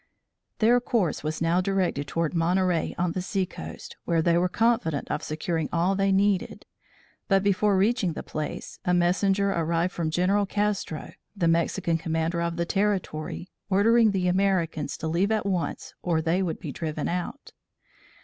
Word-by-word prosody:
Their 235 +3 +4
course 210 - 0
was 155 +2 -2
now 170 +2 +2
directed 185 -7 0
toward 165 +2 -1
Monterey 175 0 +1
on 175 0 0
the 185 - -3
sea 190 +1 -1
coast, - - -9
where 165 -2 +1
they 170 0 +3
were 180 +1 +2
confident 225 -9 +1
of - - -1
securing 160 0 -2
all 175 +3 +2
they 195 0 +1
needed, 195 0 +1 0.6
but 195 -2 +3
before 200 0 +2
reaching 200 -3 +2
the - - -6
place, 155 -1 -5
a 180 - +2
messenger 195 +3 +2
arrived 170 +1 0
from 165 -2 -1
General 190 +5 +1
Castro, 205 -6 -2 0.2
the 175 -3 +2
Mexican 165 0 +1
commander 165 +1 -1
of 170 0 -1
the 170 0 -1
territory, 185 -4 -2 0.2
ordering 225 +4 +5
the 190 -3 0
Americans 180 -6 0
to 160 - -4
leave 175 +6 +1
at 215 -2 0
once 185 -4 -2
or 170 -3 +1
they 165 +4 +1
would 175 -4 -2
be 155 -6 -6
driven 155 0 -3
out. 180 +10 -4
180 Hz, 165 wpm, -26 LUFS, 165-195 Hz, 0.6 s, ordering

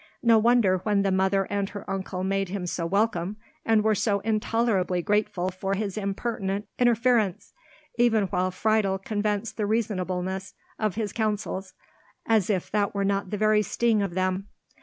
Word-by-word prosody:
No 230 -2 +6
wonder, 220 -5 +4
when 200 +1 +1
the 195 - +1
mother 190 +1 +2
and 200 -1 -1
her 205 - -8
uncle 190 -1 -3
made 195 0 0
him 190 -1 -3
so 170 -1 -2
welcome, 200 0 0 0.3
and 220 -2 +3
were 220 0 +3
so 205 0 +1
intolerably 215 -4 0
grateful 205 -3 0
for 195 +1 -2
his 200 -1 -3
impertinent 200 -1 -2
interference, 235 -5 +2 0.4
while 240 - +5
even 190 -5 +1
Friedel 210 -1 +1
confessed 210 +2 -2
the 210 -2 0
reasonableness 190 -3 -2 0.2
of 215 -4 0
his 210 -3 -3
counsels, 210 -3 -2 0.5
as 220 -4 +2
if 190 -4 -1
that 205 -1 0
were 200 0 0
not 195 -1 0
the 210 - -3
very 215 0 +3
sting 220 +1 +1
of 195 -3 -3
them. 185 +1 -1
200 Hz, 160 wpm, -26 LUFS, 190-215 Hz, 0.5 s, No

